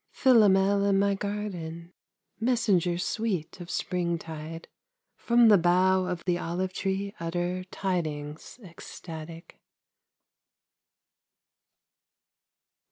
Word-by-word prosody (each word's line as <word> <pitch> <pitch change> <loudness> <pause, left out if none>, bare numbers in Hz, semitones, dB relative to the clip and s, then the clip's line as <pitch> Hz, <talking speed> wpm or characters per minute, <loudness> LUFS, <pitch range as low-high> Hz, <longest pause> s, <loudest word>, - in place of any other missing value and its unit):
Philomel 200 -5 +4
in 200 -1 +3
my 200 0 +2
garden, 180 -5 -5 0.5
Messenger 215 -8 +1
sweet 190 -3 -2
of 175 - -9
springtide, 165 -3 -4 0.5
From 235 0 +4
the 205 -3 +7
bough 185 +2 +3
of 180 -2 -4
the 175 -1 +1
olive 180 +2 -3
tree 195 +1 -2
utter 175 +2 -2
Tidings 160 -3 -4
ecstatic. 165 -2 -10
180 Hz, 85 wpm, -27 LUFS, 170-200 Hz, 0.5 s, the